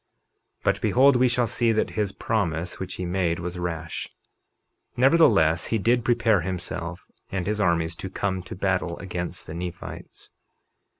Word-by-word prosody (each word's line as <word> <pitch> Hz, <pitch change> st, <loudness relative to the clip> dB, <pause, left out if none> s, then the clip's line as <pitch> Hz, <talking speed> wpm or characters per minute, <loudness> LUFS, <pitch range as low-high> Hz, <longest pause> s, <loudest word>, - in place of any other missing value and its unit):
51:10 -, -, -37 dB
But -, -, +1 dB
behold, 135 Hz, +2 st, +5 dB
we 125 Hz, +1 st, +4 dB
shall 120 Hz, 0 st, +2 dB
see 115 Hz, 0 st, +1 dB
that 110 Hz, -, 0 dB
his 105 Hz, -3 st, -1 dB
promise 90 Hz, -6 st, -2 dB
which 95 Hz, -1 st, -5 dB
he 90 Hz, -, -4 dB
made 90 Hz, -2 st, 0 dB
was 90 Hz, +1 st, -5 dB
rash; 80 Hz, -2 st, -4 dB, 0.9 s
nevertheless, 115 Hz, -, +4 dB
he 115 Hz, -, +1 dB
did 120 Hz, +3 st, +2 dB
prepare 115 Hz, -5 st, +3 dB
himself 90 Hz, -1 st, -5 dB, 0.3 s
and 95 Hz, -2 st, -2 dB
his 105 Hz, +1 st, -1 dB
armies 85 Hz, -3 st, +1 dB
to 95 Hz, -, -5 dB
come 95 Hz, 0 st, -2 dB
to 90 Hz, -, -8 dB
battle 95 Hz, -3 st, -1 dB
against 90 Hz, -2 st, -5 dB
the 80 Hz, -, -7 dB
Nephites. 90 Hz, +1 st, -8 dB
95 Hz, 160 wpm, -25 LUFS, 85-115 Hz, 0.9 s, behold